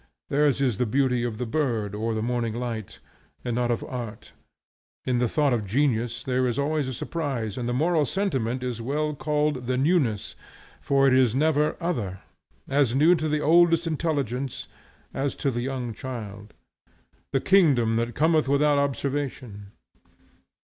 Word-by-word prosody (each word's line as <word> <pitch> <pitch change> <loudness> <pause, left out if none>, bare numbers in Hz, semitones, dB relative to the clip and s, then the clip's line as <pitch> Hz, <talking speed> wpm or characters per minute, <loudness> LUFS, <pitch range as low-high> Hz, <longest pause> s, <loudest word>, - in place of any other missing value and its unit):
Theirs 145 -1 +2
is 125 -7 +1
the 125 - +1
beauty 125 0 +1
of 120 -3 -3
the 125 - -3
bird 115 -6 -1
or 110 +2 -2
the 110 - -2
morning 120 -2 -1
light, 115 -4 -5 0.5
and 120 - -1
not 120 0 0
of 120 - -1
art. 120 -4 -7 0.7
In 125 -1 +1
the 125 - +2
thought 145 +2 +1
of 115 -3 0
genius 120 +1 0
there 130 0 +1
is 120 - -2
always 145 0 0
a 130 - -3
surprise; 130 - -3
and 120 -1 -3
the - - 0
moral 160 +4 +2
sentiment 130 - -1
is 120 -2 -3
well 150 +5 -1
called 150 -3 -1
"the 130 0 0
newness," 135 - +1 0.5
for 135 -1 +2
it 130 - +4
is 130 -3 +4
never 150 +1 +2
other; 115 - -3 0.5
as 135 -3 +2
new 155 +6 +5
to 155 -3 -1
the 150 0 0
oldest 170 +1 +4
intelligence 140 -6 -2 0.5
as 135 +1 -2
to 140 - -1
the 120 -1 -2
young 125 -2 -3
child; 105 -4 -8 0.8
"the 135 - +2
kingdom 135 - +4
that 115 0 -2
cometh 155 -2 +2
without 145 +1 +3
observation." 135 -7 -3
130 Hz, 165 wpm, -25 LUFS, 120-150 Hz, 0.8 s, new